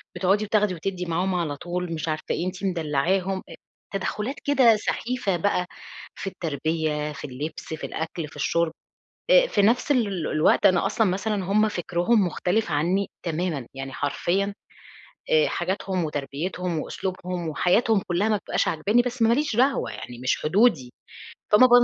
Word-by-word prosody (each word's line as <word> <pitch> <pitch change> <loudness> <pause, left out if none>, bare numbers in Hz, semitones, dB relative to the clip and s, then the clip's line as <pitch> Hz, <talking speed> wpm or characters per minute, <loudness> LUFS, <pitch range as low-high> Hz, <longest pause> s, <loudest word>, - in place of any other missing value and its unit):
بتقعدي 195 +4 +2
بتاخدي 210 -2 +2
وتدي 180 +1 -4
معاهم 180 +3 0
على 155 -5 -1
طول؟ 175 0 -4
مش 160 0 -4
عارفة 155 0 -2
إيه، 170 - -1
أنتِ 185 +1 -6
مدلعاهم. 180 +2 0
آآ - - -9 0.4
تدخلات 210 +6 -2
كده 260 -6 +5
سخيفة 225 -3 -1
بقى 180 0 +1 0.5
في - - -6
التربية، 155 -3 -2
في - - -7
اللبس، 150 +5 -6
في 160 - -7
الأكل، 160 0 -4
في - - -16
الشُرب. 165 +3 +1 0.6
آآ - - +7
في 205 - +1
نفس 240 +7 +2
ال 200 - 0
الوقت 155 0 +3
أنا 180 -2 +4
أصلًا 225 - +2
مثلًا 195 +1 -1
هُم 215 +3 +3
فكرهم 180 +3 +1
مختلف 180 +6 0
عني 175 +7 +1
تمامًا، 165 -6 -2
يعني 135 0 -6
حرفيًا. 195 +9 -1 0.8
آآ 475 0 +5
حاجاتهم 190 -2 -2
وتربيتهم 155 +4 -3
وأسلوبهم 180 0 -4
وحياتهم 195 +6 +2
كلها 185 +5 +1
ما 215 - +3
بتبقاش - - -1
عاجباني، 205 +10 +2
بس 250 -1 -3
ما 230 +1 +5
ليش 290 -5 0
دعوة 265 +3 +2
يعني، 120 -1 -8
مش 130 0 -1
حدودي. 160 - +3 0.6
فما 255 +5 +8
ب - - -4
180 Hz, 155 wpm, -25 LUFS, 160-210 Hz, 0.8 s, فما